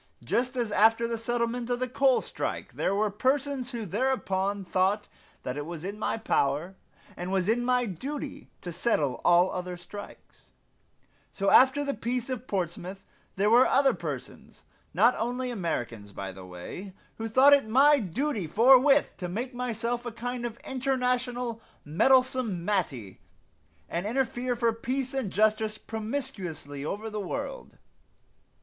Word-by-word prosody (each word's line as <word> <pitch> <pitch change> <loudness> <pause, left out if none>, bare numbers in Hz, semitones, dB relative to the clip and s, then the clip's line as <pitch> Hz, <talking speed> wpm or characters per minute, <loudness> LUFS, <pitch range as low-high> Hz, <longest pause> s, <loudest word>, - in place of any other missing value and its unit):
Just 255 +2 -1
as 235 -3 -1
after 225 +3 +4
the 230 - -2
settlement 235 +1 -2
of 245 0 0
the 255 - -1
coal 260 +1 +3
strike, - - -4
there 195 - 0
were 210 0 +1
persons 265 +3 0
who 235 -3 -4
thereupon 200 -3 -1
thought 190 +3 +1 0.4
that 125 +2 -4
it 145 - -4
was 170 -2 -7
in 200 +3 -5
my 220 - -1
power, 165 -3 0 0.4
and 180 +1 -5
was 190 -1 +1
my 245 0 +1
duty, 275 - -6
to 175 - -6
settle 160 - 0
all 175 +1 +5
other 180 -1 -4
strikes, 205 +4 -12 0.8
so 195 0 0
after 265 +3 +6
the 280 - -1
peace 245 +3 -3
of 255 0 -5
Portsmouth 185 0 -4 0.3
there 205 +2 +2
were 245 +2 +7
other 275 0 +4
persons - - -7 0.3
not 240 +2 +4
only 245 +2 -2
Americans, 120 - -3
by 95 -1 -6
the 95 -1 -11
way, 135 - -8 0.3
who 225 - -2
thought 260 +6 +6
it 280 -5 +4
my 280 +6 +5
duty 220 - -2
forthwith 265 - +5
to 180 -2 -4
make 240 +8 -4
myself 240 -1 -2
a 240 - -5
kind 240 +1 -4
of 235 -1 -9
international 250 -3 -1 0.2
Meddlesome 250 - +2
Mattie 140 - -2 0.7
and 175 +4 -3
interfere 245 0 -1
for 235 -1 +1
peace 255 +3 -3
and 265 -7 -1
justice 215 +1 +2
promiscuously 200 - -5
over 205 +8 -4
the 210 0 -3
world. - - -5
225 Hz, 150 wpm, -28 LUFS, 190-255 Hz, 0.8 s, were